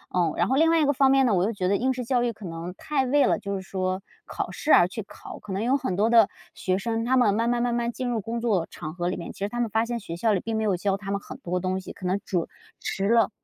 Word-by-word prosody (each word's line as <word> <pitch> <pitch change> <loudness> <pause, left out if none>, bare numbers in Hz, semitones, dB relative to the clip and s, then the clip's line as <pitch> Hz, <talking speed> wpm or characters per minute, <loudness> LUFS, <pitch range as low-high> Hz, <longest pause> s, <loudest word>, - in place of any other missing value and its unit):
嗯。 170 -3 +2
然 - - +2
后 265 - +1
另 325 +4 +4
外 330 - +4
一 - - +3
个 285 - +3
方 270 0 +4
面 270 0 +5
呢， 225 - +2
我 180 - +2
又 210 - +1
觉 190 -4 -2
得 200 - +3
应 260 +5 +1
试 250 -1 -5
教 245 0 +1
育 240 - +1
可 210 -1 -11
能 170 +1 -6
太 280 +2 -1
为 285 +3 +4
了 - - +2
就 200 -1 -5
是 190 - -4
说 185 0 -2 0.2
考 - - -4
试 310 - -1
而 175 - +7
去 215 +4 -6
考。 - - -11
可 210 - -9
能 195 +3 -1
有 260 +4 +3
很 190 -9 -2
多 210 +4 +2
的 230 -3 +6 0.3
学 185 0 0
生， 225 +3 -2
他 260 +2 +3
们 215 -5 +4
慢 230 +2 +1
慢 240 0 +1
慢 240 -1 +1
慢 235 0 0
进 255 +1 -4
入 240 -2 0
工 230 +3 -3
作 210 -8 +1
场 155 -1 -7
合 175 0 -1
里 185 - -3
面， - - -6
其 - - -16
实 200 +1 -1
他 240 - -4
们 235 -2 0
发 220 +2 +1
现 240 0 -3
学 170 -6 -7
校 215 +5 +2
里 195 - +1
并 225 +4 -3
没 220 - 0
有 205 -3 +2
教 195 +2 0
他 200 0 -6
们 200 - 0
很 205 - -10
多 180 -7 -2
东 185 +1 -1
西， - - -9
可 185 - -10
能 190 +2 +1
主 175 -3 -1 0.3
迟 195 +1 -2
了 230 0 +4
220 Hz, 345 characters per minute, -26 LUFS, 190-240 Hz, 0.3 s, 而